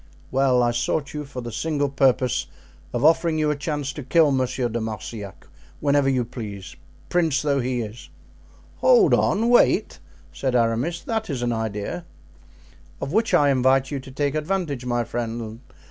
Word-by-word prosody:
"Well, 130 -2 +3
I 120 - +2
sought 140 +4 -1
you 150 -1 -4
for 135 -2 -7
the 120 -1 -6
single 145 +4 -1
purpose 130 - +1 0.4
of 120 +4 0
offering 165 0 +4
you 155 -1 +2
a - - -1
chance 145 -1 -3
to 150 - -6
kill 150 +3 +3
Monsieur 130 -1 0
de 115 0 -3
Marsillac 105 -2 -6 0.3
whenever 140 -1 +2
you 130 -3 +1
please, 105 -5 -8 0.3
prince 165 -6 +1
though 140 -2 +1
he 125 -1 -1
is." 110 +1 -8 0.7
"Hold 485 -6 +5
on! 220 +4 +2
wait!" 240 0 +3 0.3
said 130 -2 -1
Aramis; 120 +9 +1
"that 220 -3 -2
is 130 -4 -2
an 120 -1 0
idea!" 110 - -4 0.9
"Of 140 - -4
which 225 +2 +2
I 145 -1 +4
invite 130 +1 +2
you 140 - -2
to 135 - -11
take 140 +1 -1
advantage, 155 -5 -2
my 120 -1 +1
friend. 115 -1 -4
135 Hz, 165 wpm, -23 LUFS, 120-150 Hz, 0.9 s, Hold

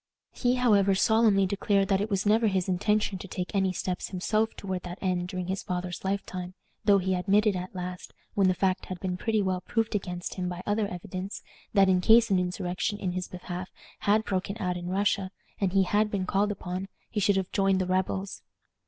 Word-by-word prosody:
He, 245 0 +1
however, 205 -6 +4
solemnly 220 -1 +4
declared 200 0 +1
that 195 -1 +3
it 210 - -2
was 195 -1 0
never 220 +2 +4
his 190 -2 0
intention 205 +1 +1
to 195 - -8
take 180 -1 -4
any 190 -2 +2
steps 180 0 -3
himself 215 +4 0
toward 190 -2 -4
that 175 +1 -7
end 180 -2 -1
during 185 -1 -4
his 190 +2 -2
father's 180 -1 -4
lifetime, 185 -2 -3 0.3
though 205 -2 +5
he 190 0 0
admitted, 200 +3 +3
at 185 +1 -5
last, 180 0 -6 0.2
when 195 -2 +3
the 185 - +3
fact 185 0 0
had 185 -2 -5
been 185 0 -2
pretty 215 +2 0
well 185 -1 -1
proved 225 +4 -1
against 180 -3 -3
him 180 -1 -3
by 180 0 -6
other 205 0 +1
evidence, 185 +2 -6 0.3
that, 195 -1 +6
in 185 -1 +3
case 225 +3 +6
an 190 - +4
insurrection 180 +3 -2
in 190 -3 -2
his 180 0 -3
behalf 180 0 -6 0.3
had 215 +2 +2
broken 195 +1 -2
out 180 -2 -1
in 175 0 -5
Russia, 195 0 +1 0.3
and 195 -3 +1
he 195 0 +4
had 210 +3 +2
been 195 -3 -1
called 200 +3 +1
upon, 185 -1 -4 0.2
he 215 - -1
should 200 0 +3
have 190 -1 -2
joined 195 -1 +2
the 185 - 0
rebels. 190 +1 -1
190 Hz, 205 wpm, -28 LUFS, 180-205 Hz, 0.3 s, that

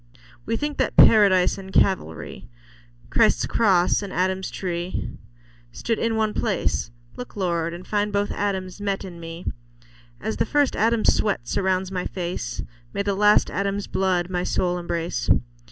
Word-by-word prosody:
We 230 - 0
think 295 +2 -3
that - - 0
Paradise 195 -4 +6
and 190 0 -9
Calvary, 185 - 0 0.6
Christ's - - +3
cross 190 -5 +3
and 200 -2 -6
Adam's 190 +1 -1
tree, 175 -1 -4 0.6
stood 230 -1 -2
in 230 -1 0
one 220 -1 +1
place; - - -1 0.3
Look, 125 - -8
Lord, 170 -4 -1
and 175 +2 -8
find 210 0 0
both 205 0 0
Adams 190 -1 -3
met 200 -1 -2
in 175 -3 -9
me; 165 +1 -8 0.7
As 110 - -3
the - - +1
first 290 -2 +2
Adam's 225 +1 +3
sweat 200 - -1
surrounds 190 -1 0
my 180 -1 -2
face, 175 - -4 0.3
May - - 0
the 200 0 0
last 210 +1 +4
Adam's 200 +1 -1
blood 185 -2 0
my 180 -1 -2
soul 180 -1 0
embrace. 170 -1 -3
190 Hz, 155 wpm, -24 LUFS, 175-205 Hz, 0.7 s, Paradise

